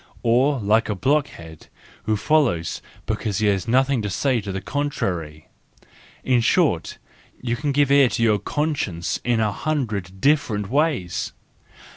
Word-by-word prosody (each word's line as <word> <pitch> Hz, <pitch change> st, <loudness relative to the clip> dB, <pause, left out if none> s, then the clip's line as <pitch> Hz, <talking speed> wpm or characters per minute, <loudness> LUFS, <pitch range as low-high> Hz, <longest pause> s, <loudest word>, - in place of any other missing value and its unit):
Or 130 Hz, +4 st, +3 dB
like 110 Hz, +2 st, +2 dB
a 105 Hz, -, -1 dB
blockhead 95 Hz, -, -2 dB, 0.4 s
who 110 Hz, -1 st, +1 dB
follows 115 Hz, -, +1 dB, 0.2 s
because 105 Hz, -3 st, -2 dB
he 110 Hz, -, +1 dB
has 100 Hz, -1 st, +1 dB
nothing 130 Hz, +1 st, +2 dB
to 105 Hz, -, -3 dB
say 125 Hz, +5 st, 0 dB
to 100 Hz, -1 st, -5 dB
the 95 Hz, -, -3 dB
contrary. 90 Hz, -, -3 dB, 0.8 s
In 125 Hz, -2 st, +2 dB
short, -, -, +1 dB, 0.4 s
you 120 Hz, -1 st, -2 dB
can 145 Hz, +3 st, -2 dB
give 140 Hz, 0 st, +2 dB
ear 140 Hz, -2 st, +6 dB
to 115 Hz, +2 st, -1 dB
your 105 Hz, -3 st, +3 dB
conscience 140 Hz, -, -2 dB
in 120 Hz, -1 st, +1 dB
a 110 Hz, -2 st, +1 dB
hundred 105 Hz, -, -3 dB
different 115 Hz, -8 st, +1 dB
ways. 110 Hz, -, 0 dB
115 Hz, 145 wpm, -22 LUFS, 95-140 Hz, 0.8 s, ear